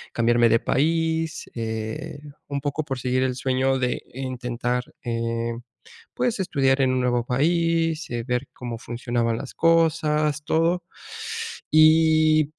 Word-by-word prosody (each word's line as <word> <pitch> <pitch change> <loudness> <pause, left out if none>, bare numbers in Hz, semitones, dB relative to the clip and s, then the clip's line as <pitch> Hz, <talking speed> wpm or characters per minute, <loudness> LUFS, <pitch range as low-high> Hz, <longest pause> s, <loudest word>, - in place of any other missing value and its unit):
cambiarme 120 0 +4
de 115 - +4
país, 160 +4 0
eh, 115 +7 -4 0.3
un 140 0 -2
poco 145 +2 -2
por 135 -3 -4
seguir 130 +1 0
el 130 -1 0
sueño 130 +1 +1
de 125 -1 -1
intentar, 125 -1 -2 0.2
eh, 115 0 -2 0.6
pues, 245 -4 0
estudiar 135 -6 +2
en 130 -1 +3
un 130 - +1
nuevo 120 -1 +1
país, 165 +4 +1
eh, 120 -1 -3
ver 125 +2 -2
cómo 120 -2 -6
funcionaban 120 0 -2
las 135 +2 -7
cosas 155 -3 +2
todo, 165 +3 +1 0.9
y,, 155 -1 +5
135 Hz, 130 wpm, -24 LUFS, 120-160 Hz, 0.9 s, y